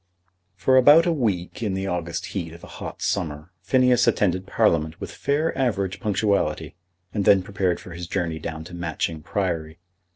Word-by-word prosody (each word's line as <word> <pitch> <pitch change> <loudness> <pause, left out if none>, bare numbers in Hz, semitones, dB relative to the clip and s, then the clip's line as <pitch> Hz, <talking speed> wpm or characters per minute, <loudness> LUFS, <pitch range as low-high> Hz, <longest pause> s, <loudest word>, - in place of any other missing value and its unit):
For 95 +8 +3
about 145 +6 +7
a 170 - +2
week 105 - -2
in 105 -4 -1
the 95 0 -2
August 85 -2 -3
heat 85 -5 -4
of 85 - -13
a - - -11
hot - - -6
summer, 75 +3 -2
Phineas 125 +4 +3
attended 95 -4 +1
Parliament 85 -8 +1
with - - -6
fair 150 +4 -1
average 100 -7 -1
punctuality, 100 -1 0 0.4
and 105 - 0
then 95 -1 +5
prepared 95 -2 -1
for 90 - -11
his 85 +1 -7
journey 85 -3 -2
down 80 0 -5
to 85 - -12
Matching 85 -2 -3
Priory. 80 -3 -2
95 Hz, 170 wpm, -24 LUFS, 85-110 Hz, 0.4 s, about